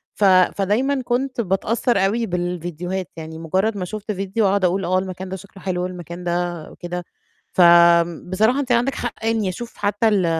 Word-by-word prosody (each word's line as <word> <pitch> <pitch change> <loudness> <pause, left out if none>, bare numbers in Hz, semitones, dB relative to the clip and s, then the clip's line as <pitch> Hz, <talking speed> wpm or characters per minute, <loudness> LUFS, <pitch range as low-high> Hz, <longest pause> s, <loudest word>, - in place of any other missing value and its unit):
ف 210 - -2
فدايمًا 205 +8 +3
كنت 250 0 -1
باتأثّر 215 +4 0
أوي 230 +4 0
بالفيديوهات 175 -1 -3
يعني 160 0 -7
مُجرّد 190 +6 0
ما 180 - -3
شُفت 210 +2 -5
فيديو 195 +2 0
أقعُد 195 -1 +2
أقول 185 +1 +1
آه 185 +1 +2
المكان 185 0 -6
ده 190 - -4
شكله 195 0 -13
حلو 180 -2 -1
والمكان 180 -1 -6
ده 175 -2 -2
وكده. 175 0 -6 0.5
فآمم 170 -1 +5
بصراحة 220 +8 +2
أنتِ 255 -3 -1
عندِك 245 +3 +2
حق 240 - -4
يعني 225 -3 0
أشوف 235 +6 -6
حتى 205 +2 +1
ال 195 -5 +2
190 Hz, 175 wpm, -21 LUFS, 175-220 Hz, 0.5 s, فآمم